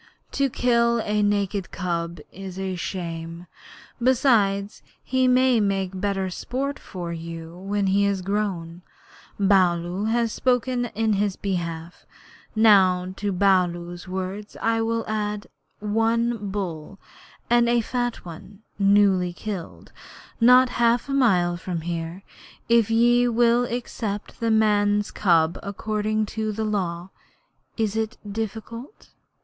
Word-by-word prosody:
'To 275 -1 +1
kill 235 -1 +2
a 210 0 +1
naked 200 -2 0
cub 170 -2 -3
is 190 -1 -8 0.2
shame. 170 -1 -5 0.6
Besides, 215 -6 +2 0.2
he 260 0 +1
may 255 -1 +4
make 195 -2 0
better 195 -2 -1
sport 275 +8 -3
for 175 -2 -6
you 165 0 -7
when 200 +2 -2
he 195 +1 +3
is 200 -2 -1
grown. 185 -4 -3 0.6
Baloo 185 -1 +2
has 230 0 +1
spoken 250 0 0
in 220 0 +1
his 200 -1 0
behalf. 170 -3 -5 0.5
Now 185 -4 +4
to 205 0 -2
Baloo's 175 -2 +1
word 190 +3 -4
I 225 0 +1
will 230 0 -1
add 210 -1 -2 0.3
one 225 0 0
bull, 190 -3 -5 0.5
and 240 0 +3
a 240 0 +3
fat 245 -1 -3
one, 190 +5 -11 0.2
newly 195 -3 +3
killed, 190 -2 -7 0.5
not 250 +2 +6
half 235 +3 +2
a - - -1
mile 180 -10 +3
from 175 -2 -4
here, 170 +2 -5 0.4
if 230 -2 +4
ye 240 +2 +4
will 240 +1 +3
accept 225 -4 -5
the 230 - 0
man's 210 -1 +2
cub 170 -3 +2
according 215 +1 -2
to 220 -1 -1
the 220 +1 -3
Law. 185 -4 -2 0.7
Is 220 -2 0
it 225 +2 -2
difficult?' 225 - -6
205 Hz, 120 wpm, -24 LUFS, 185-230 Hz, 0.7 s, not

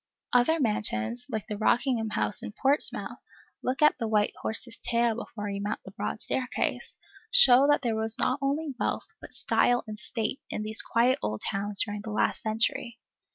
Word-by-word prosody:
Other 250 +7 +3
mansions 220 - 0
like 220 -4 -4
the 210 -1 -6
Rockingham 235 0 +1
House 210 - -1
in - - -7
Portsmouth 275 +2 0 0.4
(look 260 +4 -1
at 300 - +4
the 230 - -2
white 210 -1 +1
horse's 225 +1 -5
tail 235 -1 +1
before 215 -2 -6
you 200 0 -4
mount 210 +1 -3
the - - -10
broad - - -5
staircase) 255 -1 -2 0.3
show 285 - +8
that 290 -1 +3
there 230 -3 0
was 220 0 -2
not 255 +2 0
only 285 +2 -1
wealth, - - -2
but - - -11
style 245 0 +1
and 215 -1 -8
state, 225 +3 -3
in 215 - -3
these 215 0 +1
quiet 240 +3 +2
old 105 0 -3
towns 200 0 +2
during 205 -1 -5
the 220 - -8
last 210 - 0
century. 230 +1 -1
230 Hz, 180 wpm, -27 LUFS, 215-255 Hz, 0.4 s, show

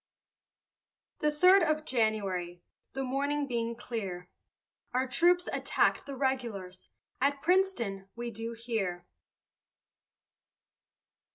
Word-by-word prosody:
The 300 - +2
third 365 +6 +6
of 310 -2 +1
January, 195 - -1 0.3
The 270 - -2
morning 285 +3 0
being 235 -2 -1
clear, 195 -7 -5 0.6
Our 260 +1 +2
troops 350 +7 +3
attack'd - - +1
the 280 - -5
regulars, 235 -9 -3 0.3
At 280 +1 +1
Princeton, 310 - +1
we 240 0 -4
do 225 +2 -5
hear. 215 -7 -3
240 Hz, 95 wpm, -30 LUFS, 200-285 Hz, 0.6 s, third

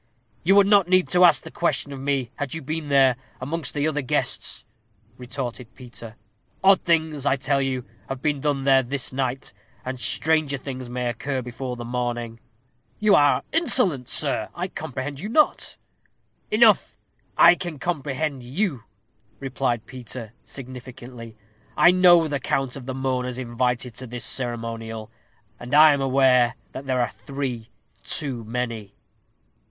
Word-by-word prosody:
"You 195 +4 +4
would 200 -1 +7
not 200 -3 +4
need 185 0 +3
to 180 0 +4
ask 175 - +6
the - - -9
question 150 -4 -1
of 135 - -7
me, 135 -3 -1
had 145 0 -4
you 160 - -6
been 155 +1 -4
there, 135 -3 +4 0.2
amongst 150 +3 -3
the 145 +1 +1
other 150 -1 -1
guests," 130 - -1 0.5
retorted 125 -2 -6
Peter. 120 -3 -9 0.5
"Odd 195 0 +6
things, 160 -4 0
I 135 - +3
tell 140 +1 0
you, 130 -2 -2 0.2
have 135 - -4
been 145 +1 -1
done 140 -1 -1
there 135 -1 +5
this 130 +1 -2
night, 130 -3 -3 0.3
and 130 0 -4
stranger 155 +1 +1
things 130 -2 -7
may 125 0 -3
occur 130 +2 -3
before 125 +1 -5
the 120 -1 -7
morning." 120 -1 -3 0.6
"You 215 -1 +3
are 145 -4 +4
insolent, 240 - +3
sirrah! - - +1
I - - -3
comprehend 135 +2 -5
you 210 - -5
not." 305 +6 +2 0.7
"Enough! 215 -1 +4 0.4
I 170 - +8
can 175 -3 -5
comprehend 145 -2 -3
you," 135 - -2 0.5
replied 130 -4 -2
Peter, 120 -3 -8
significantly; 125 -3 -9 0.4
"I 175 - +7
know 175 -3 +6
the 145 -2 -2
count 135 -2 -1
of 135 -2 -9
the 130 - -4
mourners 125 -2 -2
invited 125 0 -2
to 130 - -6
this 120 +1 -5
ceremonial, 115 -3 -2 0.5
and 125 +4 -3
I 155 0 +8
am 140 - -1
aware 130 -2 +3 0.2
that 135 - -8
there 130 -1 +1
are 120 - +1
three 130 -5 -5 0.3
too 130 -6 -3
many." 115 -3 -4
135 Hz, 155 wpm, -24 LUFS, 125-150 Hz, 0.7 s, I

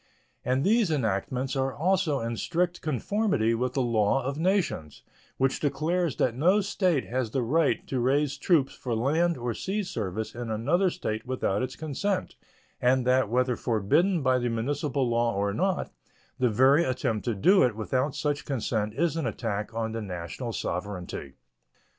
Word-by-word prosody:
And 130 +2 +1
these 215 0 +3
enactments 130 0 -1
are 135 0 0
also 170 -4 +1
in 115 +1 -2
strict 175 +8 -1
conformity 155 - 0
with 125 +2 -1
the 135 - +2
law 115 +2 +2
of 135 +2 -2
nations, 170 - -1 0.3
which 135 0 +1
declares 155 +3 0
that 120 - +1
no 175 - +3
state 185 -7 +1
has 125 -1 -2
the 130 +2 -1
right 150 +5 +1
to 130 - -2
raise 135 +3 +1
troops 150 -4 +2
for 120 -3 -3
land 160 +8 +1
or 120 -1 -2
sea 200 - -2
service 110 - -4
in 120 -1 -5
another 145 - +2
state 115 -11 -4
without 115 -6 0
its 130 0 -3
consent, 160 +6 -2 0.5
and 125 0 +3
that, 130 -3 +3
whether 125 +1 +1
forbidden 135 - +1
by 130 -1 +3
the 120 0 -1
municipal 135 +3 -1
law 115 -1 +1
or 100 0 0
not, 190 - -1 0.5
the 125 -1 +3
very 130 +8 +5
attempt 115 -5 -1
to 120 -3 0
do 185 - +5
it 120 -4 +3
without 130 +6 -1
such 145 0 -1
consent 110 -5 -2
is 165 +3 +1
an 165 - -1
attack 105 -2 -3
on 115 -1 -1
the 115 0 -4
national 95 +5 -5
sovereignty. 90 -8 -4
130 Hz, 165 wpm, -27 LUFS, 115-155 Hz, 0.5 s, very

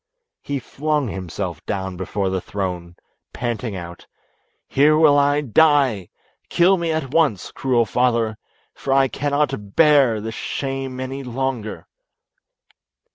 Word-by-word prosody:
He 140 - -3
flung 145 +1 -2
himself 90 -3 -5
down 95 -2 -3
before 95 +1 -2
the 95 -1 -1
throne, 90 -3 -5 0.4
panting 120 -3 -3
out, 85 -1 -9 0.6
"Here 150 +3 +4
will 155 -2 +6
I 145 +1 +3
die; 140 - +3 0.4
kill 180 +3 +4
me 170 -2 -1
at 155 -5 -2
once, 145 - +1
cruel 125 -3 +1
father, 115 -1 0 0.3
for 135 - -2
I 135 0 +4
cannot 140 -7 -2
bear 140 -8 +5
this 110 +1 -5
shame 135 +1 -4
any 130 +1 -4
longer." 125 -3 -4
130 Hz, 125 wpm, -21 LUFS, 100-145 Hz, 0.6 s, will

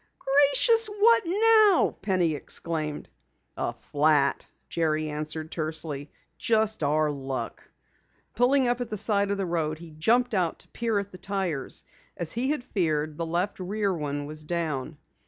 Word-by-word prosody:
"Gracious! 285 - +5
What 435 +3 +4
now?" 425 0 +4
Penny 185 -5 +1
exclaimed. 150 0 -4 0.5
"A - - -2
flat," 145 -1 +1 0.2
Jerry 155 -2 -1
answered 155 +1 -5
tersely. 155 -3 -4 0.3
"Just 220 -3 +1
our 150 +1 +1
luck." 135 -4 -6 0.6
Pulling 250 +3 +3
up 245 +1 0
at 245 - -4
the 215 - -3
side 200 0 +2
of 200 - -1
the 195 - -1
road, 160 -3 -1
he 165 0 -12
jumped 230 +11 +1
out 180 -5 0
to - - -13
peer 230 -3 -1
at 200 0 -3
the 185 - -11
tires. 190 -9 -3 0.3
As 170 -2 -3
he 250 +4 -1
had 295 -4 -1
feared, 155 -8 -1
the 165 - -2
left 175 +5 -2
rear 200 +1 -1
one 145 -3 -3
was 155 +1 -6
down. 155 -3 -3
175 Hz, 155 wpm, -26 LUFS, 155-230 Hz, 0.6 s, Gracious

